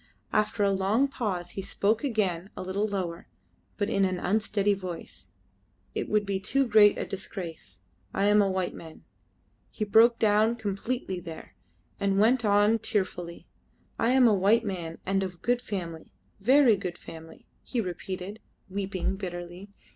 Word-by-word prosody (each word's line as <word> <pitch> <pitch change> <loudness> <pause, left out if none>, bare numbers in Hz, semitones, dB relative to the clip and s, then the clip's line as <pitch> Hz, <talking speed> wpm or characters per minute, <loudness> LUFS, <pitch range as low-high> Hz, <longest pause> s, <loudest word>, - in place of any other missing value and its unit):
After 215 0 +1
a 200 - +3
long 195 +8 +2
pause 190 -10 -3
he 195 - -5
spoke 210 +4 0
again 195 -8 -1
a - - -4
little 195 +3 -1
lower, 180 -5 -4 0.5
but 205 - 0
in 195 -3 +1
an 185 -1 +1
unsteady 205 +1 +1
voice, 185 -4 -8 0.6
"It - - -3
would 210 -1 +2
be 195 -1 -1
too 270 +8 +1
great 210 -3 +6
a - - -2
disgrace. 165 - -7 0.3
I 195 - -1
am 205 0 +5
a 200 - +2
white 185 -1 -1
man." 160 -1 -11 0.7
He 215 - -3
broke 225 +3 +5
down 215 +1 +3
completely 205 -1 -3
there, 165 -2 -9 0.5
and 195 -1 +1
went 230 +4 +4
on 205 +2 +4
tearfully, 185 -5 -3 0.5
"I 230 - +2
am 255 -1 +6
a 220 - +5
white 205 +4 +3
man, 170 -5 -4
and 195 0 +1
of 180 -3 -5
good 245 +1 +1
family. 170 -8 -6 0.3
Very 250 +1 +5
good 180 -2 -5
family," 160 0 -12 0.2
he 245 - -3
repeated, 185 +1 -5 0.3
weeping 195 -1 -2
bitterly. 175 0 -7
200 Hz, 155 wpm, -28 LUFS, 185-215 Hz, 0.7 s, great